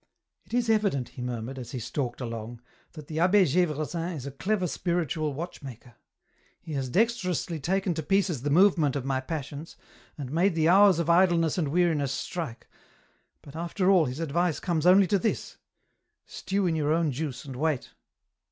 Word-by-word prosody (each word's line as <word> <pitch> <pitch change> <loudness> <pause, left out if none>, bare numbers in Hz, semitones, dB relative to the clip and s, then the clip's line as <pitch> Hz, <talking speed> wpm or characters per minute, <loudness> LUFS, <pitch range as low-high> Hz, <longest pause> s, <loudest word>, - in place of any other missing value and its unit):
" - - -51
It - - -15
is 245 -1 +1
evident," 200 - +1
he - - -10
murmured, 125 +1 -5
as 120 0 -8
he 130 - -3
stalked 120 +2 -4
along, 115 -1 -6 0.2
" - - -36
that 155 -3 -10
the 155 +2 -4
Abbe 185 +3 +5
Gevresin 165 +1 -1
is 140 -4 -7
a 140 - -5
clever 185 +7 -1
spiritual 170 -3 -1
watchmaker. 135 -7 -8 0.7
He 160 - -8
has 135 -2 -2
dex 225 - +3
terously 175 -3 -3
taken 190 +4 0
to 160 - -3
pieces 185 - 0
the 145 - -2
movement 165 -3 +4
of 135 -2 -3
my 135 -1 0
passions, 145 +1 -6 0.4
and 135 -4 -6
made 170 +3 +2
the 160 -1 +2
hours 195 -1 +6
of 170 -2 -1
idleness 170 -1 +3
and 155 - 0
weariness 155 -3 +1
strike, 140 -2 -5 0.8
but, 140 - -13
after 175 +3 0
all, 180 -5 +5
his 130 +2 -5
advice 165 +1 0
comes 170 -2 0
only 190 +2 +7
to 195 +2 +1
this: 220 - -2 0.7
stew 195 0 -2
in 170 -2 +1
your 150 -1 0
own 160 -1 +2
juice 140 -1 -5
and 135 -2 -7
wait. 150 -1 -1
160 Hz, 185 wpm, -27 LUFS, 140-180 Hz, 0.8 s, only